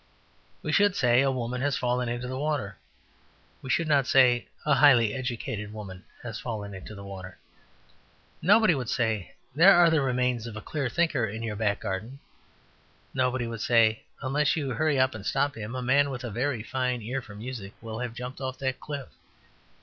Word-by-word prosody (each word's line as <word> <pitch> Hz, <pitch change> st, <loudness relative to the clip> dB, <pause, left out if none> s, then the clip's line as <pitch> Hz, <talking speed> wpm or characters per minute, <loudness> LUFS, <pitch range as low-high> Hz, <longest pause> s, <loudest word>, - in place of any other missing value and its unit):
We -, -, -2 dB
should 205 Hz, -2 st, +4 dB
say, 125 Hz, 0 st, +4 dB
"A 135 Hz, -, +3 dB
woman 125 Hz, -1 st, -2 dB
has 145 Hz, 0 st, +1 dB
fallen 125 Hz, -1 st, 0 dB
into 120 Hz, +1 st, -3 dB
the 130 Hz, -, -4 dB
water." 145 Hz, -10 st, -2 dB, 0.8 s
We 130 Hz, -, -8 dB
should 165 Hz, +5 st, +1 dB
not 140 Hz, -4 st, +3 dB
say, 125 Hz, -3 st, +4 dB, 0.2 s
"A 150 Hz, -, +4 dB
highly 120 Hz, -8 st, +5 dB
educated 115 Hz, -5 st, -4 dB
woman 95 Hz, -4 st, -9 dB, 0.2 s
has 115 Hz, -3 st, -5 dB
fallen 105 Hz, -4 st, -5 dB
into 95 Hz, +3 st, -9 dB
the 100 Hz, -, -9 dB
water." 95 Hz, -2 st, -9 dB, 1.0 s
Nobody 205 Hz, +1 st, +5 dB
would 130 Hz, -6 st, -3 dB
say, 110 Hz, -6 st, -1 dB, 0.2 s
"There 175 Hz, +7 st, +7 dB
are 175 Hz, -1 st, +6 dB
the 160 Hz, -2 st, +3 dB
remains 125 Hz, -3 st, 0 dB
of 115 Hz, -, -8 dB
a -, -, -4 dB
clear 140 Hz, -1 st, -3 dB
thinker 150 Hz, -5 st, +1 dB
in 110 Hz, +3 st, -6 dB
your 110 Hz, -2 st, -3 dB
back 105 Hz, -1 st, 0 dB
garden." 110 Hz, +5 st, -4 dB, 1.0 s
Nobody 125 Hz, -1 st, 0 dB
would 115 Hz, -2 st, -5 dB
say, 115 Hz, -2 st, +3 dB, 0.2 s
"Unless 145 Hz, +2 st, +1 dB
you 140 Hz, -4 st, -2 dB
hurry 140 Hz, +3 st, +1 dB
up 130 Hz, 0 st, +3 dB
and 110 Hz, -3 st, -8 dB
stop 140 Hz, +6 st, 0 dB
him, 110 Hz, +2 st, -6 dB
a 130 Hz, -, -3 dB
man 140 Hz, +3 st, +3 dB
with 130 Hz, -2 st, -5 dB
a 120 Hz, -, -4 dB
very 120 Hz, +1 st, -1 dB
fine 125 Hz, -1 st, -2 dB
ear 130 Hz, +5 st, -3 dB
for 105 Hz, -4 st, -12 dB
music 110 Hz, -2 st, -7 dB
will 110 Hz, -1 st, -6 dB
have 120 Hz, -2 st, -4 dB
jumped 125 Hz, +3 st, -7 dB
off 130 Hz, -1 st, -4 dB
that 130 Hz, -1 st, -2 dB
cliff." 145 Hz, -3 st, -6 dB
125 Hz, 190 wpm, -27 LUFS, 110-135 Hz, 1.0 s, There